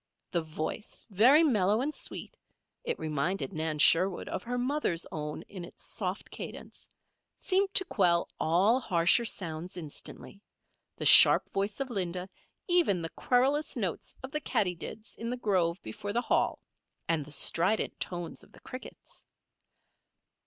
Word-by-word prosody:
The 170 - +1
voice, 155 +6 -5
very 255 - +6
mellow 210 - +3
and 290 +4 -1
sweet - - -5 0.5
(it - - -2
reminded 160 +6 -2
Nan 155 -1 -2
Sherwood 175 +5 +4
of - - -3
her 245 +4 -4
mother's 250 - 0
own 150 -1 -5
in 185 -3 -9
its - - -8
soft - - -3
cadence) - - -9 0.5
seemed 385 +1 +1
to 380 - +6
quell 170 - +2
all 195 +10 +3
harsher 180 +1 +3
sounds 175 -3 -5
instantly 170 +4 -8 0.5
the - - -5
sharp - - +8
voice 200 +4 -1
of 270 -2 -3
Linda, 180 -3 -1 0.4
even 340 - +3
the 165 - -2
querulous 270 - +1
notes - - -3
of 260 - -7
the 300 0 -2
katydids 205 - -2
in 230 - -4
the 250 - -2
grove 185 -6 +1
before 205 - -6
the 240 - +1
Hall, - - 0 0.4
and 165 -3 +1
the 145 - -13
strident 180 +8 +1
tones 175 -2 -5
of - - -20
the - - -16
crickets. 255 - -8
195 Hz, 145 wpm, -30 LUFS, 170-245 Hz, 0.5 s, sharp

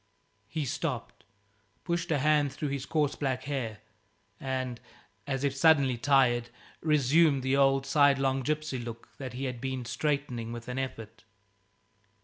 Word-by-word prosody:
He 150 +5 -3
stopped, 140 -5 -4 0.6
pushed 170 0 -2
a 155 - +2
hand 145 0 +3
through 145 +2 -3
his 140 -1 -4
coarse 150 -3 +1
black 130 -3 -2
hair, 130 -7 -4 0.6
and, 130 -2 -3 0.5
as 135 -1 -2
if 140 -1 0
suddenly 140 -3 +4
tired, 120 -2 +3 0.3
resumed 150 -1 +3
the 130 +1 +2
old, 135 0 +3
sidelong 135 -2 +3
gypsy 150 -2 -2
look 115 -1 -8
that 130 -2 -6
he 130 +2 -5
had 125 -3 -4
been 130 -2 -3
straightening 135 -5 -2
with 120 0 -7
an 125 +1 -3
effort. 115 -4 -6
135 Hz, 140 wpm, -29 LUFS, 125-145 Hz, 0.6 s, suddenly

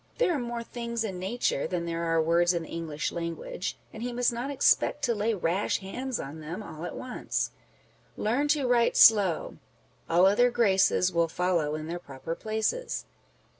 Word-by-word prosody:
There 370 -8 +2
are 295 - -1
more 240 -1 -4
things 235 -1 -4
in 190 -4 -4
nature 190 - -1
than 175 -2 -2
there 170 0 -3
are 165 0 +2
words 170 +2 +3
in 170 - -1
the - - -11
English 160 -2 -3
language, 170 +2 -4 0.2
and 220 - -8
he 245 +1 -3
must 245 0 +1
not 240 +4 -3
expect 285 +1 +2
to 240 -4 +2
lay 220 +1 0
rash 180 +2 0
hands 250 +6 -4
on 145 +4 -7
them 165 +7 -6
all 160 -3 -8
at 175 - -6
once. 255 -1 -3 0.7
Learn 250 +7 +1
to 290 -2 +2
write 240 -1 +3
slow: 200 -7 +5 0.5
all 175 +3 +5
other 215 +6 +5
graces 195 -5 +3
Will 170 0 +2
follow 170 -3 0
in 155 0 -5
their 170 +2 -4
proper 140 +1 -6
places. 220 - -2
195 Hz, 180 wpm, -28 LUFS, 170-240 Hz, 0.7 s, slow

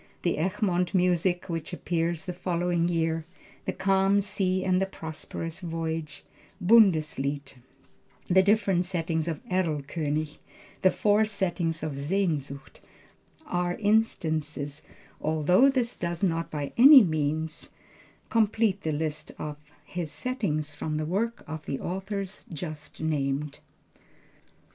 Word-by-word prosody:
The 170 -3 +1
Egmont 185 0 0
music, 180 0 +2
which 165 -1 -4
appeared 170 -1 -1
the 180 +2 -5
following 175 -1 0
year, 165 -1 0 0.4
the - - 0
Calm 195 +1 +3
Sea 190 -2 0
and 185 0 +3
Prosperous 160 +1 -6
Voyage, 165 -3 -4 0.4
Bundeslied, 155 - +3 0.7
the 190 +1 +5
different 200 -2 +3
settings 165 -3 -1
of 160 -3 -4
Erlkönig, 155 -3 -1 0.4
the 185 - +6
four 210 +2 +3
settings 175 -6 -1
of 145 -3 -3
Sehnsucht 145 -4 -2 0.7
are 175 0 -1
instances, 160 -9 0 0.4
although 160 - +4
this 250 -3 0
does 170 +1 -3
not 165 -3 +1
by 145 -2 -4
any 270 0 +10
means 155 -1 -2 0.6
complete 220 -2 +2
the 160 - -1
list 155 0 -3
of 150 -1 -5 0.3
his 170 -3 -5
settings 155 - -2
from 155 +1 -3
the 155 - -1
works 215 +8 -1
of 155 0 -7
the 135 - -2
authors 195 +2 -4
just 155 -2 -7
named. 145 -2 -1
170 Hz, 115 wpm, -27 LUFS, 155-190 Hz, 0.7 s, any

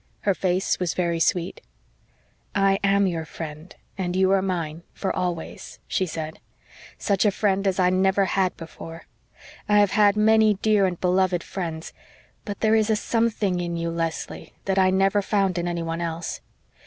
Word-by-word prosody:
Her 200 - +2
face 185 0 0
was 180 -2 -1
very 170 -2 0
sweet. 170 +1 0 0.9
"I 195 0 +3
am 200 0 +3
your 170 -3 -1
friend 155 +2 -8 0.2
and 180 -1 -2
you 190 0 +3
are 195 -1 +4
mine, 170 -4 -3
for 195 - -2
always," 175 -3 -4
she 185 - 0
said. 160 -1 -5 0.6
"Such 200 -3 +1
a 210 - +5
friend 195 -1 0
as 190 0 +1
I 180 0 +4
never 190 +1 +3
had 185 -1 0
before. 165 0 -10 0.6
I 210 - +5
have 205 -2 +4
had 205 -1 +4
many 220 0 +5
dear 205 -1 +3
and 180 -2 -4
beloved 180 -1 +1
friends 165 -4 -5 0.5
but 205 -2 -6
there 220 0 +3
is 220 0 +3
a 220 - +4
something 215 -4 0
in 170 -1 -3
you, 170 0 -2
Leslie, 165 -1 -4
that 195 0 +1
I 185 -1 +5
never 195 +2 +2
found 195 -3 0
in 175 - -2
anyone 165 -1 -3
else. 165 0 -4
185 Hz, 170 wpm, -24 LUFS, 170-200 Hz, 0.9 s, a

